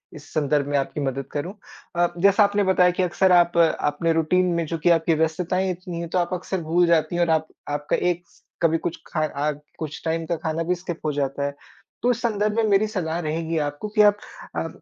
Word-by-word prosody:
इस 145 0 -12
संदर्भ 145 -2 +1
में 145 - +1
आपकी 140 +2 -2
मदद 135 -1 -2
करूँ। 160 +6 -4 0.4
अ, 175 0 +3
जैसा 200 +3 +5
आपने 205 0 +2
बताया 185 -2 +4
कि - - +4
अक्सर 180 +1 +2
आप 175 -1 +4
अपने 165 0 +2
रूटीन 165 +3 +2
में 165 - -1
जो 165 +2 -3
कि - - +4
आपकी 165 -1 +3
व्यस्तताएँ 175 +4 0
इतनी 175 -1 -6
है 170 - -4
तो 175 - -2
आप 175 +1 -1
अक्सर 185 0 -3
भूल 175 +2 +4
जाती 165 0 +2
हैं 175 - +1
और 170 - 0
आप 160 0 +2 0.2
आपका 145 0 -1 0.2
एक 175 +1 -5 0.4
कभी 165 -1 +3
कुछ 175 - -3
खा 155 -2 -1 0.2
अग 150 -1 -2 0.2
कुछ 150 -2 -5
टाइम 165 0 -1
का 170 +1 -1
खाना 160 +1 -1
भी 180 +2 0
स्किप 175 -1 -6
हो 150 - +1
जाता 140 0 -2
है। 140 0 -3 0.5
तो 245 - +3
इस 235 - -2
संदर्भ 210 -2 0
में 230 - +2
मेरी 205 +2 +3
सलाह 170 -5 -2
रहेगी 165 0 -2
आपको 145 +6 -2
कि 215 - +6
आप 205 0 +5 0.4
अ, - - -1
170 Hz, 225 wpm, -23 LUFS, 155-185 Hz, 0.5 s, कि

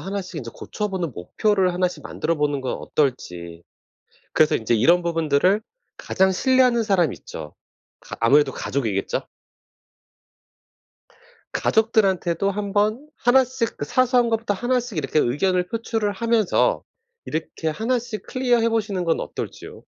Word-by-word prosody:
하나씩 190 -2 -5
이제 115 -3 -7
고쳐보는 190 - -4
목표를 185 - +1
하나씩 180 0 -1
만들어 165 - -2
보는 145 -2 0
건 130 - -2
어떨지. 90 - -3 0.7
그래서 155 -1 +4
인제 115 +1 0
이런 170 +11 +4
부분들을 165 +3 +2 0.4
가장 190 0 +1
신뢰하는 250 +2 +3
사람 185 - +2
있죠? 75 -2 -9 0.5
가 - - -9
아무래도 135 +4 +4
가족이겠죠. 110 -10 -2 2.3
가족들한테도 195 -5 +2
한번 210 +7 -1
1 260 +2 +4
씩 250 -2 -3
그 145 - -3
사소한 250 - +2
것부터 225 -2 0
1 245 +4 +1
씩 230 -9 -6
이렇게 155 +1 0
의견을 180 +8 +1
표출을 225 -2 -2
하면서 230 - +1 0.4
이렇게 160 0 -3
1 225 +10 0
씩 230 -2 -6
클리어해 245 -3 +2
보시는 210 -5 -1
건 165 -1 +1
어떨지요? - - -7
190 Hz, 300 characters per minute, -23 LUFS, 155-230 Hz, 2.3 s, 그래서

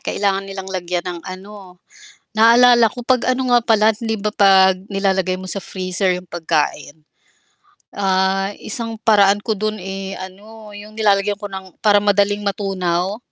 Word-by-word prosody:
kailangan 195 -1 -2
nilang 195 -1 -7
lagyan 180 -1 -3
ng 175 -2 -5
ano, 185 -1 -11 0.6
naalala 235 +1 +6
ko 245 -1 -9
'pag 255 0 +1
ano 255 -1 -1
nga 240 - +6
pala, 220 -1 +3
hindi 225 0 -3
ba 210 +1 -3
'pag 190 -2 +5
nilalagay 190 -2 0
mo 185 - -9
sa 195 - -4
freezer 185 0 -2
yung 180 - -11
pagkain, 155 -2 -3 0.9
ah, 195 0 0
isang 230 +1 -5
paraan 205 -2 +4
ko 220 -2 -2
dun, 215 0 -3
eh, 195 +1 -6
ano 210 +3 -12
yung 210 +1 -12
nilalagyan 205 -1 +1
ko 205 -1 -7
ng 190 -2 -10
para 205 -1 +4
madaling 205 0 +1
matunaw, 190 -1 -2
195 Hz, 155 wpm, -19 LUFS, 190-215 Hz, 0.9 s, naalala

